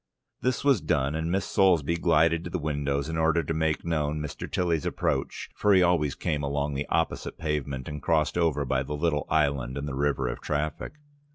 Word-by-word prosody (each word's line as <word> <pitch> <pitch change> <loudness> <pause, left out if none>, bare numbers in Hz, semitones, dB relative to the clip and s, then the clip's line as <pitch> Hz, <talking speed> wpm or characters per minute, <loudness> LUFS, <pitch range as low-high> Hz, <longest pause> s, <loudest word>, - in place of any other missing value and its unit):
This 125 +1 0
was 140 -9 +4
done, 75 -2 0
and 80 +1 -2
Miss 95 0 0
Soulsby 85 -4 +3
glided 85 0 +3
to 85 - -5
the 90 - -2
window, 70 -3 -1
in 80 +2 -3
order 80 +1 +2
to 80 - -2
make 80 -1 0
known 75 -2 -1
Mr. 75 -1 -6
Tilly's 85 -4 0
approach, - - -2
for 105 -1 +3
he 95 - +6
always 85 -5 +2
came 75 -1 -2
along 70 +1 -1
the 70 +1 -3
opposite - - -1
pavement 70 -4 -3
and 75 -1 -6
crossed 80 -1 +1
over 80 -4 +1
by 65 0 0
the 75 +2 -4
little 75 -1 0
island 70 -4 +1
in 70 - -3
the 70 - -4
river 70 -1 0
of - - -4
traffic. 75 - -3
75 Hz, 200 wpm, -27 LUFS, 70-85 Hz, -, he